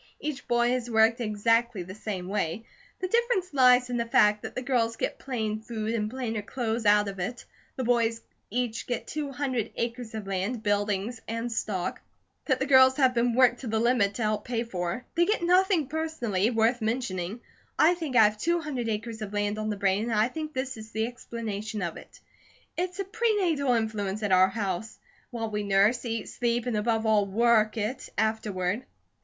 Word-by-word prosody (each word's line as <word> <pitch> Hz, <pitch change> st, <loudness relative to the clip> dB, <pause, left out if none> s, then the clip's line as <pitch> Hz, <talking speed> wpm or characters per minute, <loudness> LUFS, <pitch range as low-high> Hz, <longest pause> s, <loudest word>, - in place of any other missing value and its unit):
Each 295 Hz, -2 st, -5 dB
boy 240 Hz, 0 st, +2 dB
is 245 Hz, -1 st, -2 dB
worked 225 Hz, +1 st, +3 dB
exactly 230 Hz, -1 st, +1 dB
the 185 Hz, +2 st, -9 dB
same 195 Hz, -3 st, -5 dB
way; 200 Hz, +1 st, -2 dB, 0.4 s
the 370 Hz, -, 0 dB
difference 460 Hz, -5 st, +1 dB
lies 250 Hz, -2 st, +5 dB
in 245 Hz, -, 0 dB
the 235 Hz, 0 st, -1 dB
fact 210 Hz, -2 st, +4 dB
that -, -, -7 dB
the 255 Hz, -, -3 dB
girls 235 Hz, -3 st, +1 dB
get -, -, -3 dB
plain 220 Hz, -5 st, -2 dB
food 220 Hz, -1 st, -3 dB
and 210 Hz, -2 st, -1 dB
plainer 230 Hz, -3 st, -3 dB
clothes 225 Hz, 0 st, -2 dB
out 210 Hz, 0 st, +5 dB
of 195 Hz, -1 st, -6 dB
it; 220 Hz, +7 st, -4 dB, 0.3 s
the 260 Hz, -, -3 dB
boys 230 Hz, -1 st, +2 dB, 0.3 s
each 240 Hz, 0 st, -2 dB
get 245 Hz, -, -2 dB
two 300 Hz, -2 st, -4 dB
hundred 255 Hz, -5 st, -2 dB
acres 230 Hz, -1 st, -4 dB
of 215 Hz, -2 st, -5 dB
land, 195 Hz, +4 st, -2 dB
buildings 205 Hz, +2 st, -1 dB
and 230 Hz, +1 st, -3 dB
stock, 195 Hz, -5 st, -2 dB, 0.4 s
that 260 Hz, -3 st, +1 dB
the 270 Hz, -, 0 dB
girls 260 Hz, -1 st, +6 dB
have 260 Hz, -3 st, +4 dB
been 235 Hz, 0 st, +1 dB
worked 250 Hz, -1 st, +4 dB
to 260 Hz, -, -7 dB
the 220 Hz, 0 st, 0 dB
limit 225 Hz, -3 st, +2 dB
to 230 Hz, -, -2 dB
help 215 Hz, -1 st, 0 dB
pay 235 Hz, -1 st, -2 dB
for; 180 Hz, +1 st, -4 dB
they 340 Hz, -, +3 dB
get 420 Hz, -2 st, 0 dB
nothing 360 Hz, -2 st, +3 dB
personally, 255 Hz, -10 st, -1 dB
worth 230 Hz, +1 st, +2 dB
mentioning. 220 Hz, -3 st, -2 dB, 0.4 s
I 320 Hz, +3 st, +6 dB
think 320 Hz, -7 st, -5 dB
I 225 Hz, -, +8 dB
have 210 Hz, 0 st, +2 dB
two 340 Hz, +7 st, +1 dB
hundred 265 Hz, -8 st, -3 dB
acres 220 Hz, +1 st, -4 dB
of 210 Hz, -1 st, -5 dB
land 205 Hz, +1 st, -1 dB
on 215 Hz, 0 st, -2 dB
the 210 Hz, -, -2 dB
brain, 195 Hz, +2 st, +1 dB
and -, -, -1 dB
I 215 Hz, +2 st, +3 dB
think 310 Hz, +2 st, -5 dB
this 260 Hz, -1 st, -3 dB
is 220 Hz, 0 st, -10 dB
the 220 Hz, 0 st, -1 dB
explanation 220 Hz, -3 st, -5 dB
of 170 Hz, -2 st, -3 dB
it. -, -, -14 dB, 0.6 s
It's 360 Hz, +1 st, -2 dB
a 395 Hz, -, -1 dB
pre 445 Hz, +3 st, +1 dB
natal 315 Hz, -10 st, +1 dB
influence 215 Hz, -2 st, -2 dB
at 205 Hz, -, 0 dB
our 185 Hz, 0 st, +6 dB
house; 200 Hz, 0 st, -3 dB, 0.3 s
while 225 Hz, -2 st, -4 dB
we 210 Hz, 0 st, -1 dB
nurse, 200 Hz, +4 st, +3 dB
eat, 225 Hz, -2 st, -3 dB
sleep, 240 Hz, -1 st, -1 dB
and 245 Hz, -3 st, -1 dB
above 225 Hz, +1 st, 0 dB
all, 210 Hz, -2 st, +3 dB
WORK 220 Hz, +1 st, +3 dB
it, 220 Hz, +5 st, -3 dB
afterward." 210 Hz, -2 st, 0 dB
230 Hz, 200 wpm, -27 LUFS, 210-250 Hz, 0.6 s, I